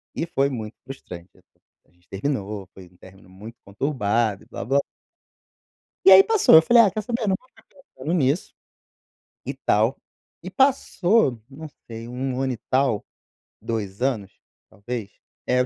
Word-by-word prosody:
e - - -2
foi 140 -4 0
muito 110 -4 -6
frustrante, 95 -9 -10 0.6
a - - -33
gente 90 0 -33
terminou, 100 -3 -4
foi 95 -2 -13
um 90 - -25
término 95 0 -17
muito 105 +5 -12
conturbado 110 -2 -1
e - - -22
blá 100 - -7
blá 135 +3 +2 1.3
E - - +9
aí 390 - +10
passou, 410 - +6
falei: 235 +8 +6
"Ah, 200 - +3
quer 215 - -3
saber? 230 +1 -3
Não 190 - +2
vou 255 - -28
ficar - - -23
pensando 275 - -8
nisso, 145 0 0 0.9
e - - -3
tal". - - +1 0.5
E - - -6
passou, 225 - +2
não 155 +4 -9 0.2
sei, 115 0 -8
1 130 +1 -3
ano 130 -1 -1
e - - -7
tal, 130 -5 +1 0.6
2 105 -3 -4
anos, 115 -8 -1 0.4
talvez, 105 +1 -6 0.4
é. 125 0 +2
125 Hz, 155 wpm, -23 LUFS, 100-160 Hz, 1.3 s, aí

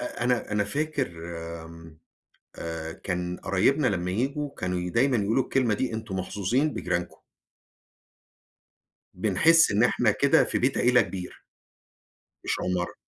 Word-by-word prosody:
أ 120 -1 -4
أنا 125 -3 0
أنا 105 -1 +1
فاكر 145 +4 -2 0.6
آمم 80 -1 -13 0.6
آآ 80 -1 -5
كان 90 0 -4
قرايبنا 125 +9 +1
لمّا 90 -4 0
ييجوا 140 +8 -2
كانوا 90 0 -2
ي 90 - -4
دايمًا 125 +5 +2
يقولوا 110 +5 +1
الكلمة 120 -5 +1
دي: 125 +2 -2
"أنتم 110 -3 -5
محظوظين 110 +11 0
بجيرانكم." 90 -1 -3 2.0
بنحسّ 110 - +4
إن 105 +3 +3
إحنا 120 -2 +3
كده 140 +7 +4
في - - -1
بيت 130 +2 +1
عيلة 125 0 +4
كبير 90 0 -7 1.0
مش - - 0
عمارة. 90 -1 -2
105 Hz, 135 wpm, -26 LUFS, 90-130 Hz, 2.0 s, بنحسّ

